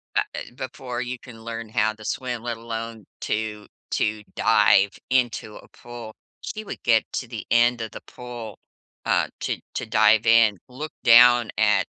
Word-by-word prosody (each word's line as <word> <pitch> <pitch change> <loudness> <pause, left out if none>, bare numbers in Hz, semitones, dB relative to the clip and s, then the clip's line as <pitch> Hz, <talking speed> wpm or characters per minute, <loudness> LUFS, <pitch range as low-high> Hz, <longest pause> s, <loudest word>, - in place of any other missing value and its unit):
ah, - - +3
uh, - - -3 0.2
before 125 -1 -5
you 125 0 -4
can 115 -2 -13
learn 115 -1 -6
how 110 0 +1
to 110 - -14
swim, 125 -3 -3
let 120 -1 -3
alone 115 -2 -6 0.2
to 105 -1 -3 0.2
to 105 0 -1
dive 105 -2 +4 0.2
into 120 -4 0
a - - -15
pool. 120 -2 -10 0.3
She 215 0 -6
would 205 - -8
get 115 -2 +4
to 125 - -3
the 115 -2 -7
end 120 0 +4
of 110 - -5
the - - -9
pool, 120 -4 -9 0.5
uh, - - +2
to - - -2 0.2
to - - -2
dive 110 0 +4
in, 115 -3 +5
look 150 +5 -7
down 120 -1 +7
at 105 -3 +3
115 Hz, 170 wpm, -24 LUFS, 110-120 Hz, 0.5 s, down